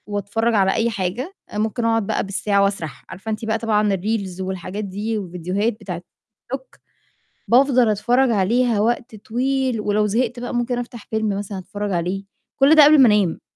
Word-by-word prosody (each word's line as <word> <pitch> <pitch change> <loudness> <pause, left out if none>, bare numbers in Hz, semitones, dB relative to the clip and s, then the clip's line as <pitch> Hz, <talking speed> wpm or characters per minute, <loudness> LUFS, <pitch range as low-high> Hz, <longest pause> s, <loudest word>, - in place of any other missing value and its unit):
وأتفرّج 210 +3 -1
على 195 -2 +3
أي 230 +1 +1
حاجة، 225 - -3 0.2
ممكن 220 +2 -1
أقعد 225 -3 +1
بقى - - 0
بالساعة 200 +1 +1
وأسرح، 170 -9 -3
عارفة 190 +4 -6
أنتِ 215 +1 -4
بقى 220 0 0
طبعًا 210 -3 +1
الReels 190 -1 -3
والحاجات 190 +2 -4
دي 210 +3 -3
وفيديوهات 185 +3 -2
بتاعة 180 -4 -5 0.5
الTikTok، 265 -1 -14 0.7
بافضل 250 -1 +4
أتفرّج 245 +5 +2
عليها 230 +2 +2
وقت 235 +2 -1
طويل، 255 +2 -1
ولو 210 0 +1
زهقت 240 +3 -1
بقى 245 - -5
ممكن 240 0 -1
أفتح 240 -2 -7
فيلم 220 -2 -1
مثلًا 200 -1 -5
أتفرّج 205 +2 -5
عليه، 180 +3 -2 0.3
كُلّ 275 +3 +6
ده 305 -2 +9
قبل 300 +1 +7
ما - - +8
أنام. 205 -6 +2
215 Hz, 170 wpm, -21 LUFS, 195-240 Hz, 0.7 s, ده